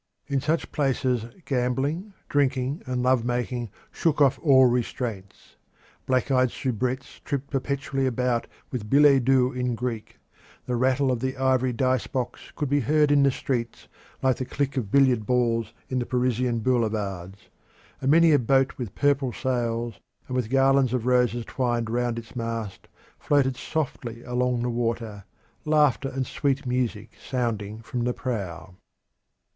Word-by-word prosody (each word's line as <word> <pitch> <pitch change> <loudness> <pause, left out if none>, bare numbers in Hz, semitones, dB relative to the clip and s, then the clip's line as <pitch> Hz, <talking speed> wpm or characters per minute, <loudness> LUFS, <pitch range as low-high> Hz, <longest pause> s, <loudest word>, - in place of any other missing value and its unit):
In 140 -2 -1
such 160 +4 -1
places 130 -5 0 0.2
gambling, 140 - -1
drinking, 140 0 0
and 125 -1 -1
lovemaking 125 -1 0 0.2
shook 160 -3 0
off 140 -2 +4
all 135 -4 +6
restraints. 120 -5 -3 0.5
Black 130 +1 +1
eyed 130 -1 +4
soubrettes 130 +2 -3
tripped 140 -1 -4
perpetually 135 0 -1
about 125 -1 0 0.2
with 110 -5 -4
billets 140 -1 +6
doux 130 0 +3
in 125 -2 -2
Greek; 115 -2 -5 0.5
the 125 - -1
rattle 130 +2 +2
of 125 - -1
the 130 +2 -3
ivory 130 -1 +2
dice 130 0 0
box 130 -3 -4
could 150 - -2
be 145 +2 +2
heard 150 +3 +3
in 145 -1 +5
the 140 - +5
streets, 120 -3 -3 0.4
like 130 -1 +3
the 130 - -3
click 140 +2 -2
of 120 -7 -2
billiard 125 -4 +3
balls 115 -2 +1 0.2
in 130 - -1
the 120 - -2
Parisian 125 -1 0
boulevards; 105 -6 -2 0.5
and 135 - 0
many 165 +2 +6
a 145 - +5
boat 135 +3 +2
with 115 -6 -5
purple 140 -3 +2
sails 120 -3 -2 0.3
and 125 - -4
with 125 -4 -1
garlands 135 -1 +3
of 120 -2 -2
roses 125 -2 +2
twined 120 -3 -1
round 120 0 0
its 115 +1 -9
mast 115 -4 -4 0.3
floated 135 -3 +2
softly 125 -5 -4
along 125 0 0
the 125 - 0
water, 115 -3 -3 0.4
laughter 150 -3 +2
and 130 0 -2
sweet 140 +1 -1
music 120 -4 -2
sounding 115 -4 -3
from 125 -1 -3
the 125 +1 0
prow. 95 -9 -5
125 Hz, 150 wpm, -25 LUFS, 120-135 Hz, 0.5 s, all